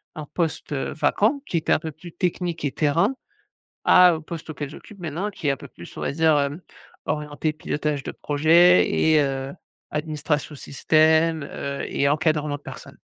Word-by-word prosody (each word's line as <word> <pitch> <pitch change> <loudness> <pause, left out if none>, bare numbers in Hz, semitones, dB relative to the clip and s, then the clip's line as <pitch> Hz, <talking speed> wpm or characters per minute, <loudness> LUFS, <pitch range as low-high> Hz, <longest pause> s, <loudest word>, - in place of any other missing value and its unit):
un 155 - -6
poste, 165 -3 -2
heu, 135 - -3
vacant 230 - +1
qui 175 - -1
est 160 - -3
un - - +5
peu 160 0 -6
plus 165 +3 -12
technique 175 -3 -2
et 140 - 0
terrain, 170 - +1 0.7
à 180 -1 +7
un 160 -2 -3
poste 160 0 -8
auquel 145 -2 -5
j'occupe 200 +6 -13
maintenant 175 +5 -3
qui 165 - -5
est - - +4
un 135 - -3
peu - - -11
plus - - -13
on - - -5
va - - -1
dire, 160 0 +3
hem, 145 +4 -2 0.4
orienté 150 0 -2
pilotage 150 -2 -3
de - - -5
projet 165 +5 +4
et 155 -1 +3
heu, 135 -1 -2 0.4
administration 150 0 -2
système, 160 +2 +2
heu 140 0 -5
et 140 - 0
encadrement 150 -1 +1
de - - -24
personne. - - -11
155 Hz, 185 wpm, -23 LUFS, 145-165 Hz, 0.7 s, à